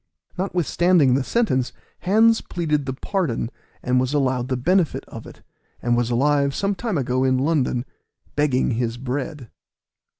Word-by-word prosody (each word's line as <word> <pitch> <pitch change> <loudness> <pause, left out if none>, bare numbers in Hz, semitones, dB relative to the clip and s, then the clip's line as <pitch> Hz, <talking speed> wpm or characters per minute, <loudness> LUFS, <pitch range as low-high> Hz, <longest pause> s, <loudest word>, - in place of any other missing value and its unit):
Notwithstanding 175 -5 +2
the 135 +1 +2
sentence, 130 - 0 0.3
Hands 220 +5 +4
pleaded 150 -5 -2
the 130 - -1
pardon, 135 - -2 0.3
and 125 0 +2
was 130 +3 0
allowed 130 -3 +1
the 130 -1 -1
benefit 175 +6 +1
of - - -9
it, - - -14 0.4
and 120 0 +1
was 120 0 0
alive 140 +3 +2
some 200 0 0
time 215 -2 -2
ago 130 -1 0
in 130 -1 +2
London, 135 -3 0 0.5
begging 140 -3 +1
his 115 0 -1
bread. 130 0 -5
140 Hz, 145 wpm, -22 LUFS, 125-175 Hz, 0.5 s, Hands